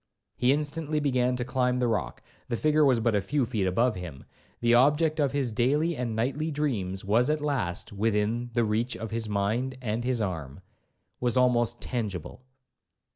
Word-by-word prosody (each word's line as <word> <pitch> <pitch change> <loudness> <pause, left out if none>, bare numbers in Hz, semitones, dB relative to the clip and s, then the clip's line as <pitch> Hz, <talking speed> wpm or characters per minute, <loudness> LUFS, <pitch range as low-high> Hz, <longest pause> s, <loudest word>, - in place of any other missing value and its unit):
He 125 +1 +3
instantly 150 +1 -1
began 125 -3 +1
to 125 -1 -3
climb 125 -1 +1
the 125 -1 +1
rock,—the 110 - -4
figure 155 +2 +3
was 130 -5 +4
but 115 0 +1
a 100 - +2
few 135 +7 0
feet 110 -5 -1
above 115 +6 +2
him,—the 90 - -4
object 150 +5 +4
of 140 -3 +2
his 135 -4 -1
daily 145 +9 +1
and 120 -4 -3
nightly 140 +8 -1
dreams 110 -12 -2
was 115 +7 +3
at 155 0 +1
last 135 -13 -2
within 110 +3 0
the 120 - +3
reach 115 +4 -1
of 115 -1 -6
his 115 -1 -2
mind 110 +6 -1
and 115 -1 -2
his 125 -1 0
arm,—was 95 - -5
almost 120 -2 +2
tangible. 105 -7 -4
120 Hz, 165 wpm, -27 LUFS, 105-135 Hz, -, was